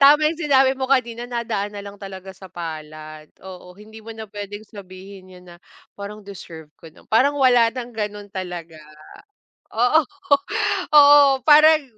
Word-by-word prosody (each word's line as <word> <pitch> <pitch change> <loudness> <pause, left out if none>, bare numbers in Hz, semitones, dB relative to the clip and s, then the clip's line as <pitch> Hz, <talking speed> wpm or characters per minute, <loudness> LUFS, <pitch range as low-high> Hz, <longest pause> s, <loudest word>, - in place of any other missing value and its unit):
Tama 300 +2 +5
yung 325 - -8
sinabi 270 -4 +3
mo 260 - -2
kanina 240 -3 -1
nadaan 220 -4 -4
na 200 - -7
lang 200 0 -11
talaga 190 -1 -9
sa 190 0 -14
palad. 155 -2 -9 0.2
Oo, 180 -1 -12
hindi 215 +2 -14
mo 225 0 -9
na 220 0 -8
puwedeng 205 0 -8
sabihin 190 -2 -13
'yun 180 0 -16
na, 175 - -14 0.4
"Parang 205 +1 -9
deserve 165 -6 -12
ko 165 - -13
na" 160 - -21
Parang 280 +6 +3
wala 245 -4 +4
ng 245 -1 -7
gano'n 210 -2 -6
talaga. 175 -4 -8 0.9
Oo, 250 +7 +2 0.9
oo 285 -2 +6
parang 305 +2 +6
210 Hz, 155 wpm, -21 LUFS, 185-260 Hz, 0.9 s, oo